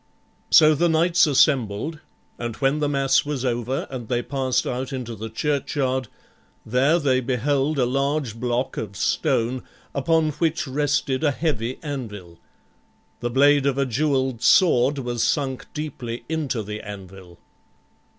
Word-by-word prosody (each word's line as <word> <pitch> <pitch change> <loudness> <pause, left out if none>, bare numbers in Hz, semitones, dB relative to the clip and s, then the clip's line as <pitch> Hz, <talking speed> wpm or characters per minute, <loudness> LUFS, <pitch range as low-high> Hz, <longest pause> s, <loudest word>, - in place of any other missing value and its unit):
So 155 0 +7
the 170 +3 +2
knights 170 +1 +4
assembled, 140 0 +2 0.4
and 120 -1 -4
when 135 +2 +1
the 145 -1 0
mass 135 -1 +2
was 145 -3 -3
over 120 +1 -1
and 125 -4 -6
they 120 +1 -1
passed 130 -2 -1
out 130 +2 -3
into 125 -3 -5
the 110 +1 -6
churchyard, 130 0 -1 0.6
there 135 +8 +3
they 135 -6 +2
beheld 135 +4 0
a 130 - +3
large 135 -2 -1
block 125 +1 -1
of 100 -3 -5
stone, 120 +5 0 0.3
upon 155 +3 +1
which 165 +1 -1
rested 140 0 0
a 150 - +4
heavy 130 -5 -2
anvil. 105 - -7 0.8
The 120 - -2
blade 140 +2 +4
of 140 -1 0
a 140 - +2
jeweled 130 -1 0
sword 145 -3 +4
was 120 -3 -2
sunk 135 -3 -1
deeply 130 -6 -6
into 150 -8 -2
the 105 +1 -6
anvil. 95 -3 -10
130 Hz, 140 wpm, -23 LUFS, 120-145 Hz, 0.8 s, So